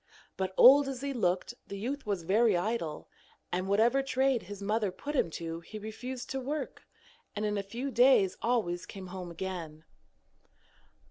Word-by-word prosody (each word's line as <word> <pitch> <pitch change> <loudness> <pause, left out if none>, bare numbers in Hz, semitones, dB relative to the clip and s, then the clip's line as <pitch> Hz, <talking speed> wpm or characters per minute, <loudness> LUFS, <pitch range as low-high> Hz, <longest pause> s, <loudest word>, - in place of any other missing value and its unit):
But, 190 0 -3
old 275 +3 +8
as 265 -2 -4
he 280 0 -2
looked, 185 -6 0
the 200 - -6
youth 255 +5 -4
was 195 -5 -1
very 210 +2 +3
idle, 175 -5 -2 0.4
and 185 +2 -1
whatever 230 +7 +3
trade 265 -2 +1
his 205 -1 -9
mother 210 0 0
put 290 +10 -6
him 170 - +2
to 165 0 -5
he 190 +6 -9
refused 240 +4 -6
to 270 - -2
work, 290 +4 -5 0.5
and 210 +1 -1
in 210 0 0
a 200 - 0
few 235 +8 -5
days 245 -6 +5
always 190 -8 0
came 195 -2 -8
home 180 -2 -6
again. 170 -3 -6
210 Hz, 165 wpm, -30 LUFS, 185-255 Hz, 0.5 s, old